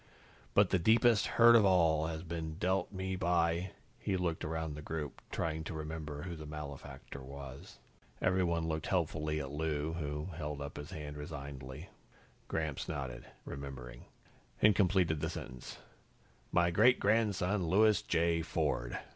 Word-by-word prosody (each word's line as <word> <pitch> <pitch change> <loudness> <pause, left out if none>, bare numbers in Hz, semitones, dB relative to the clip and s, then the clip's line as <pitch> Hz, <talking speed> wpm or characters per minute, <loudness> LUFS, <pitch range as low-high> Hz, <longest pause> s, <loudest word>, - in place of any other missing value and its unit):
"But 100 -2 +5
the 95 - +3
deepest 110 +3 +4
hurt 120 0 +9
of 115 - +7
all 80 -5 +4
has 80 0 -4
been 80 -2 -4
dealt 95 +3 0
me 95 -1 -3
by 85 0 +1 0.2
" - - -33
He 95 - -1
looked 85 -3 -1
around 80 0 -2
the 75 - -7
group, 75 -1 -5
trying 80 -1 -2
to 80 - -5
remember 75 -1 -5
who 85 -2 -5
the 75 -1 -8
malefactor 70 -2 -8
was. 70 0 -9 0.4
Everyone 85 -3 +1
looked 80 -1 -2
helpfully 75 -4 0
at 70 -2 -5
Lou, 75 +1 -1
who 75 0 -3
held 75 -2 -4
up 70 0 -6
his 75 +2 -7
hand 75 -4 -6
resignedly. 70 -3 -7 0.6
Gramps 80 -4 -2
nodded, 65 -5 -4 0.2
remembering, 65 -3 -7 0.5
and 105 -2 +6
completed 90 -5 +3
the - - -1
sentence 65 0 -7 0.7
"my 85 0 +3
great 125 +8 +5
grandson, 100 -3 +2
Louis 105 +1 +5
J. 85 0 +1
Ford." - - -1
80 Hz, 150 wpm, -34 LUFS, 75-90 Hz, 0.7 s, hurt